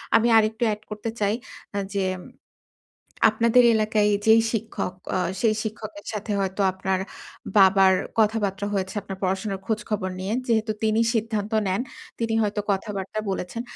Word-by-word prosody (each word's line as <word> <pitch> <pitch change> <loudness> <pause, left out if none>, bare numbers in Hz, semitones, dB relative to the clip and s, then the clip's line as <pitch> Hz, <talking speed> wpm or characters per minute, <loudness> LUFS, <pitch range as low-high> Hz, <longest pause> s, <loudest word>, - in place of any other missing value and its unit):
আমি 225 - +5
আরেকটু 220 +1 +2
এ্যাড 210 -1 -1
করতে 210 +1 -4
চাই। 205 0 +2 0.4
আ - - 0 0.2
যেম 185 -2 -1 1.1
আপনাদের 230 +3 +4
এলাকায় 215 -1 +2 0.2
যেই 220 +1 +7
শিক্ষক 220 -4 -3 0.2
অ - - +2 0.2
সেই 220 -2 +3
শিক্ষকের 215 -1 -7
সাথে 210 0 -4
হয়তো 195 +1 -1
আপনার 190 0 -1 0.6
বাবার 190 -1 +6 0.3
কথাবার্তা 205 -3 +1
হয়েছে, 190 -1 -2
আপনার 195 -1 -7
পড়াশোনার 190 +1 -1
খোঁজখবর 210 -2 -2
নিয়ে 190 +3 -2
যেহেতু 220 -2 +1
তিনি 220 0 +2
সিদ্ধান্ত 215 -2 -1 0.2
নেন, 190 +5 0 0.4
তিনি 230 -1 -1
হয়তো 210 -1 0
কথাবার্তা 195 +1 -3
বলেছেন। 190 +5 -4
210 Hz, 140 wpm, -24 LUFS, 195-220 Hz, 1.1 s, যেই